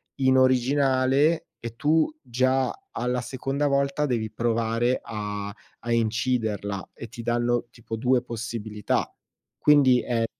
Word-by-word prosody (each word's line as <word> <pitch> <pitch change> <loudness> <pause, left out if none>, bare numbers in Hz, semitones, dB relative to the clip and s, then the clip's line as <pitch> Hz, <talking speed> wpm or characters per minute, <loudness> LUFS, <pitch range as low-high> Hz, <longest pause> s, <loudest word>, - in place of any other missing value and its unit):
in 130 -1 +3
originale 130 +3 +3 0.2
e 115 0 -6
tu 160 - +2
già 130 +2 +1 0.2
alla 125 0 -1
seconda 135 +3 -2
volta 140 +1 +1
devi 115 -5 -1
provare 115 +2 0
a 105 -2 -5 0.3
a 120 - -5
inciderla 110 -4 -1
e 115 - -9
ti 115 +1 -9
danno 120 +1 0
tipo 115 -1 -7
2 125 +2 +2
possibilità. 115 -3 -3 0.4
Quindi 140 -4 +5
è 115 -2 0
120 Hz, 120 wpm, -25 LUFS, 115-130 Hz, 0.4 s, Quindi